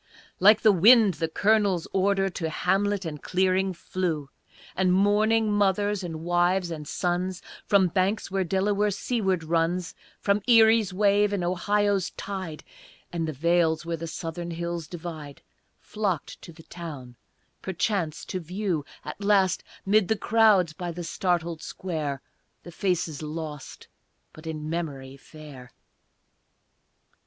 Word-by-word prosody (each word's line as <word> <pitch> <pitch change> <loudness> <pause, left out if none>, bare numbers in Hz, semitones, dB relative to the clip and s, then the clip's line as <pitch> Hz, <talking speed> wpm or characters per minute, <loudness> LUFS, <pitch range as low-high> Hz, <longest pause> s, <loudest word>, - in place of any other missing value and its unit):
Like 210 +3 +6
the 215 - +6
wind 210 +2 +6
the 165 - +1
Colonel's 200 0 +1
order 195 0 +2
To 175 -3 -3
hamlet 195 +4 0
and 150 -3 -6
clearing 190 +1 +1
flew; 165 -4 -3 0.4
And 185 -1 +2
mourning 210 +3 +3
mothers 205 0 +1
and 165 -3 -5
wives 175 +1 +1
and 150 -2 -6
sons 180 +2 -2 0.3
From 200 -3 +4
banks 190 +4 0
where 195 0 0
Delaware 200 +3 +1
seaward 195 -4 -1
runs, 165 +2 0 0.3
From 200 +1 +1
Erie's 225 -3 +5
wave, 205 +1 +3
and 195 -3 -1
Ohio's 200 +2 +1
tide, 185 -6 -6 0.5
And 165 -2 -2
the - - -2
vales 165 +2 +1
where 170 0 -2
the 165 +1 -6
southern 170 +1 -5
hills 170 -1 -4
divide, 160 -4 -8 0.4
Flocked 200 -8 -3
to - - -11
the 160 0 -15
town, 150 -8 -9 0.5
perchance 185 -3 -2
to 185 - -4
view, 180 -2 -2 0.2
At 205 - -7
last, 195 -3 +3 0.2
'mid 200 -1 +3
the 220 - +1
crowds 205 -7 +3
by 175 +2 -5
the 175 +1 -6
startled 170 -2 -1
square, 155 -7 -4 0.4
The 175 - -10
faces 170 -4 -1
lost, 155 -2 -7 0.5
but 155 +1 -12
in 155 -1 -5
memory 145 -5 -4
fair. 140 -3 -13
180 Hz, 135 wpm, -26 LUFS, 165-200 Hz, 0.5 s, Like